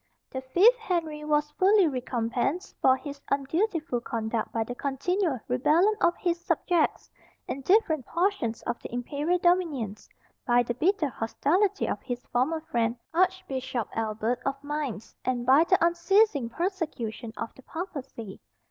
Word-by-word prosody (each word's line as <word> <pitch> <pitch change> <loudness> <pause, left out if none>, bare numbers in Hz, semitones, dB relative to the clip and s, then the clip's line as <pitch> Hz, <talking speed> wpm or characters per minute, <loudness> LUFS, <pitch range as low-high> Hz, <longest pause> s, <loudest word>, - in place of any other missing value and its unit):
The 260 - -4
fifth 370 - +5
Henry 325 -7 -2
was 295 0 +1
fully 390 -1 +5
recompensed 250 - -2
for 260 0 +5
his 280 0 -8
undutiful 305 - 0
conduct 225 -1 -2
by 225 - 0
the 245 - -6
continual 285 +4 -1
rebellion 310 - +3
of 345 0 +4
his 345 -1 -1
subjects 345 -2 0 0.4
in 275 - -4
different 315 - +2
portions 340 - 0
of - - -3
the - - -8
imperial 285 +8 -1
dominions, 325 - 0 0.3
by 245 -1 +3
the 240 - -2
bitter 340 - +1
hostility 360 - 0
of - - -2
his 245 -1 -5
former 290 +7 +1
friend, 235 -6 0 0.2
Archbishop 280 - 0
Albert, 225 +2 -1
of 275 - 0
Mainz, 285 -7 -4
and 245 -1 -1
by 275 +6 +6
the 370 +1 +4
unceasing 340 - +3
persecution 310 - -3
of 230 - -5
the - - -16
Papacy. 270 - -7
285 Hz, 140 wpm, -27 LUFS, 245-350 Hz, 0.4 s, by